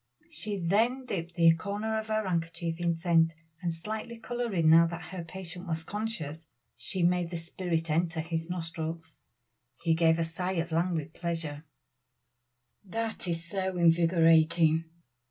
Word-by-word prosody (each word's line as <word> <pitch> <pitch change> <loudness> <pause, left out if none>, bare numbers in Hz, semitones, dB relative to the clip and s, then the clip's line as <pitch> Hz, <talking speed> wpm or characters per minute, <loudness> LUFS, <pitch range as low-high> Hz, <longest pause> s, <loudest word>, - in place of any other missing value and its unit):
She 215 -9 -4
then 225 +9 +2
dipped 170 -6 -4
the 165 -2 +6
corner 205 +6 -2
of 220 - -6
her 215 -2 0
handkerchief 165 -1 -2
in 170 -1 +1
scent, 165 -1 +3 0.3
and 175 -2 0
slightly 215 +7 -5
coloring 230 -8 -1
now 165 +1 +8
that 170 +1 -7
her 180 -2 -4
patient 180 +1 -8
was 160 -1 -2
conscious, 195 -6 -4 0.3
she 185 -2 -3
made 175 0 +2
the 170 - -4
spirit 165 -1 -2
enter 165 +1 +1
his 165 +1 -3
nostrils. 165 -2 -5 0.6
He 165 -1 +3
gave 160 0 +4
a 165 - +1
sigh 180 +3 -3
of 170 -1 -2
languid 165 -2 0
pleasure 165 -3 -4 1.2
"That 220 0 -4
is 170 -1 -2
so 190 +1 -2
invigorating." 165 -1 +4
170 Hz, 145 wpm, -30 LUFS, 165-190 Hz, 1.2 s, now